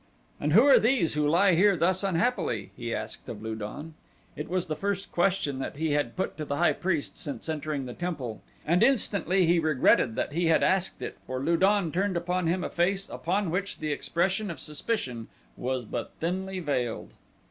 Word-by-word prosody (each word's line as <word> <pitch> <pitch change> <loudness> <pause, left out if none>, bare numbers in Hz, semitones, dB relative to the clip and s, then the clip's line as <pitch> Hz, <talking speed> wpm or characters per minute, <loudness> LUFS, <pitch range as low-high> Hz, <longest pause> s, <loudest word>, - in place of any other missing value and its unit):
"And 150 +1 0
who 225 +9 +7
are 280 - +7
these 230 -8 +2
who 150 0 +1
lie 180 +5 +4
here 195 +2 +4
thus 185 +3 +2
unhappily?" 165 - 0
he 120 -1 -5
asked 110 -1 -5
of 110 -2 -7
Lu 110 0 -3
don. 110 +9 -7 0.4
It 150 - -6
was 180 0 0
the 155 -3 -3
first 200 +2 -3
question 175 -6 +1
that 135 - -4
he 160 0 0
had 145 -5 0
put 190 - -3
to 155 - -3
the 145 - -2
high 175 +4 +3
priest 170 -6 -2
since 140 -3 -5
entering 155 -3 -3
the 125 - -6
temple, 140 -11 -4 0.2
and 170 +4 +2
instantly 200 - +3
he 170 +1 +4
regretted 140 -6 +3
that 145 - -2
he 170 +1 +1
had 165 - +4
asked 190 -1 +1
it, - - -6
for 130 0 -3
Lu 165 +6 +1
don 195 -1 +3
turned 185 +1 0
upon 180 0 -1
him 180 +2 0
a - - -2
face 190 +3 0
upon 185 +1 -1
which 195 +3 -2
the 155 -1 -3
expression 185 +7 0
of 170 - -6
suspicion 145 - -3 0.3
was 130 -1 -3
but 115 +1 -5
thinly 190 +3 -2
veiled. 125 -8 -2
170 Hz, 200 wpm, -28 LUFS, 145-190 Hz, 0.4 s, who